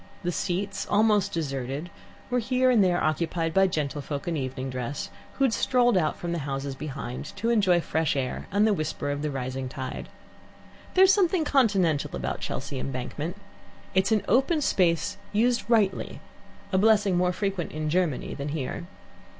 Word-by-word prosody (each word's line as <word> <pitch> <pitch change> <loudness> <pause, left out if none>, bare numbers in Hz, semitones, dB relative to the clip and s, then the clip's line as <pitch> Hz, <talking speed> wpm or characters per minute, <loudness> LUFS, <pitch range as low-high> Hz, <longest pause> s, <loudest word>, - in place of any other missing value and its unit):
The 175 - 0
seats, 195 +3 -2
almost 210 -1 +3
deserted, 140 0 -3 0.4
were 250 - +2
here 255 +2 +2
and 225 -5 +5
there 175 -1 +2
occupied 165 +1 0
by 195 +1 +5
gentlefolk 145 -3 -3
in 170 - 0
evening 130 -2 -3
dress, 125 +2 -4 0.2
who 275 - -1
had 260 -4 +3
strolled 245 -2 +3
out 155 -4 +1
from 175 - -4
the 170 - -1
houses 135 -1 -3
behind 135 -3 -6
to 225 +5 0
enjoy 190 -6 +4
fresh 160 -2 0
air 130 -2 -3
and 205 +2 +3
the 220 - +4
whisper 155 -4 -2
of 145 0 -3
the 150 - -1
rising 130 -1 -4
tide. 130 -1 -6 0.9
There 375 - +7
is 380 0 +7
something 365 -4 +2
continental 195 - +2
about - - -3
Chelsea 135 - -4
Embankment. 135 +7 -4 0.6
It 190 0 +3
is - - -2
an 215 -2 +3
open 285 +5 +3
space 170 - +1 0.2
used 235 +1 +2
rightly, 210 -5 +1 0.5
a 190 - +3
blessing 210 -2 +4
more 180 0 +2
frequent 195 -2 -2
in 155 0 -3
Germany 165 -4 0
than 140 +1 -4
here. 150 +3 -4
175 Hz, 170 wpm, -26 LUFS, 145-210 Hz, 0.9 s, There